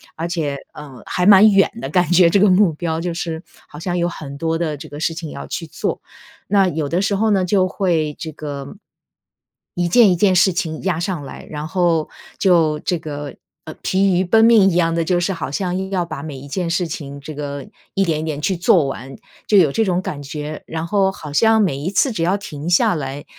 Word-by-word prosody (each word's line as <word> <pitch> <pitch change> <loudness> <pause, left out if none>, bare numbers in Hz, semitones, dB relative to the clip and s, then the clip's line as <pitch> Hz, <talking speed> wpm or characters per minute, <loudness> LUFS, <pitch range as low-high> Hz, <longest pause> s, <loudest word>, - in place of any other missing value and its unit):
而 165 +2 -3
且， 155 -5 -2 0.2
呃， 140 -5 -11
还 180 - -1
蛮 205 +2 +8
远 195 -1 +4
的， - - -4
感 180 -3 +1
觉 175 -1 +6
这 200 - +3
个 205 - +5
目 185 -1 +4
标 160 0 -3
就 175 -1 -3
是， 165 -2 -4 0.3
好 150 - -11
像 175 +1 -2
有 175 0 +1
很 140 -5 -7
多 165 +1 -1
的 155 -3 -2
这 - - -10
个 145 +1 -9
事 165 - 0
情 160 -3 -6
要 140 - -8
去 165 - -5
做。 - - -4 0.5
那 195 -1 +3
有 155 -3 -2
的 175 +5 0
时 200 0 0
候 215 +2 +1
呢 190 -2 +2
就 185 0 +2
会 165 -6 0
这 160 - -5
个 145 +1 -7 1.0
一 175 -1 0
件 215 +1 +6
一 - - +2
件 190 +1 +3
事 180 +1 +4
情 165 -4 -3
压 180 -4 0
上 175 -4 -3
来， 135 - -10
然 150 0 -5
后 170 -3 +1 0.3
就 165 -5 +3
这 175 -3 -1
个， 145 -3 -7 0.3
呃， 155 - -7
疲 190 0 +2
于 - - +2
奔 220 +5 +4
命 215 -4 +6
一 170 - -2
样 165 -1 +2
的， 165 - 0
就 175 +2 +1
是 190 +2 -1
好 165 -5 -5
像 180 +3 -2
硬 190 0 -4
要 185 -3 -1
把 140 - -7
每 145 -3 -7
一 140 +2 -10
件 175 +3 -3
事 175 +1 0
情 140 -2 -7
这 150 +2 -8
个 140 -1 -6 0.3
一 195 - +2
点 155 -2 0
一 - - -4
点 155 -3 -3
去 190 +4 0
做 170 -3 +3
完， 135 0 -6 0.3
就 210 - +4
有 155 -7 +5
这 225 - +1
种 180 -1 +1
感 170 -7 -5
觉。 150 +2 -6
然 160 0 -4
后 195 +1 +1
好 150 -6 -9
像 225 +4 +4
每 175 -9 +1
一 150 +6 -3
次 245 +6 +2
只 175 - -4
要 190 +4 +1
停 155 -4 -7
下 175 - +4
来， 140 -2 -5
170 Hz, 255 characters per minute, -19 LUFS, 150-190 Hz, 1.0 s, 蛮